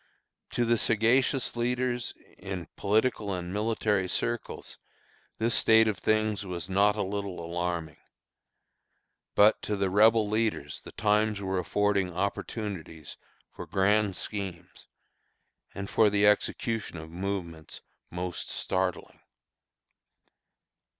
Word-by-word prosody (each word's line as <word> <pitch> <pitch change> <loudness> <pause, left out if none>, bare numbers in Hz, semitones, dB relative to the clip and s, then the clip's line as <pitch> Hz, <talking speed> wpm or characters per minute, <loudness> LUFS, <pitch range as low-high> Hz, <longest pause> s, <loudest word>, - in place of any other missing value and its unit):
To 120 - +1
the 115 -1 +2
sagacious 120 +5 +2
leaders 125 0 -1 0.2
in 95 -3 -5
political 105 0 +1
and 90 0 -5
military 105 -2 0
circles 120 +5 -3 0.6
this 115 +1 +1
state 110 0 +6
of 105 -4 -1
things 110 -1 +1
was 90 -4 -5
not 100 +2 +3
a 105 - -1
little 100 -1 -4
alarming. 85 -1 -3 1.4
But 105 +2 +5
to 105 - -2
the 100 -2 0
Rebel 110 +2 +5
leaders 110 +1 -1
the - - -11
times 105 0 +1
were 95 -1 -1
affording 100 +1 +1
opportunities 90 -4 -4 0.4
for - - -8
grand 100 0 +2
schemes, 90 -5 -6 0.9
and 100 0 -5
for 110 +1 +4
the 100 0 +2
execution 105 -1 +1
of 80 0 -9
movements 85 -3 -5 0.3
most 90 0 -5
startling. 95 -1 -2
100 Hz, 110 wpm, -28 LUFS, 90-110 Hz, 1.4 s, state